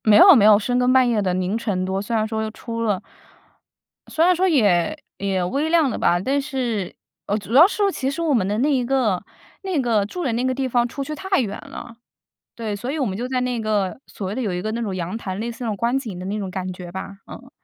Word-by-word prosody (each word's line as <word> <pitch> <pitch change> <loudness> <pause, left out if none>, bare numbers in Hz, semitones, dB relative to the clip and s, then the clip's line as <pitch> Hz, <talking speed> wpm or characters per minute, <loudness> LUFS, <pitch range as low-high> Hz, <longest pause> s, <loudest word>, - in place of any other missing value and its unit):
没 215 -2 +6
有 380 - +9
没 215 -5 +5
有 210 -1 +8
深 245 +4 0
更 250 0 +3
半 260 -1 +5
夜 230 -3 +1
的 185 -2 0
凌 185 +3 -1
晨 200 -5 -2
多， 190 +1 -2
虽 230 +3 -3
然 215 -1 +1
说 220 0 -2
出 230 +1 -6
了 210 -5 0 1.1
虽 320 - +2
然 365 0 +5
说 370 +2 +2
也 220 - +2 0.2
也 195 -2 -1
微 280 - -1
量 325 -4 +3
的 - - -3
吧， 175 - +2
但 275 +9 0
是 245 -9 -3 0.4
主 210 +2 -8
要 305 +8 +9
是 405 -1 0
其 265 -6 -2
实 310 +5 -4
我 320 -3 +1
们 210 -7 +2
的 205 +1 -1
那 290 +4 +2
一 255 -2 +1
个 240 -8 +1 0.4
那 375 -6 -1
个 230 -6 +1
住 355 - -5
的 260 - 0
那 240 +2 -1
个 260 0 +1
地 265 0 -1
方 240 -1 +1
出 275 +3 -5
去 305 - -5
太 380 +5 0
远 210 -5 -2
了， 230 - -9 0.6
对， 220 -3 -3
所 240 +6 -4
以 310 - -3
我 270 - +1
们 195 -4 -3
就 245 +3 -3
在 255 0 -1
那 250 -1 -1
个 210 -1 -1
所 195 - -6
谓 195 - -4
的 260 - -2
有 205 -6 -1
一 180 - -2
个 215 - -3
那 235 - -3
种 205 -4 -3
阳 180 +4 -3
台 190 -5 -5
类 225 +4 -3
似 235 +2 -9
那 230 - -1
种 210 - -2
观 235 +4 +1
景 220 -10 -5
的 180 - -6
那 200 +3 -2
种 195 -3 -4
感 185 0 -4
觉 180 -1 -9
吧。 190 +2 -7
嗯。 - - -11
230 Hz, 285 characters per minute, -22 LUFS, 200-265 Hz, 1.1 s, 有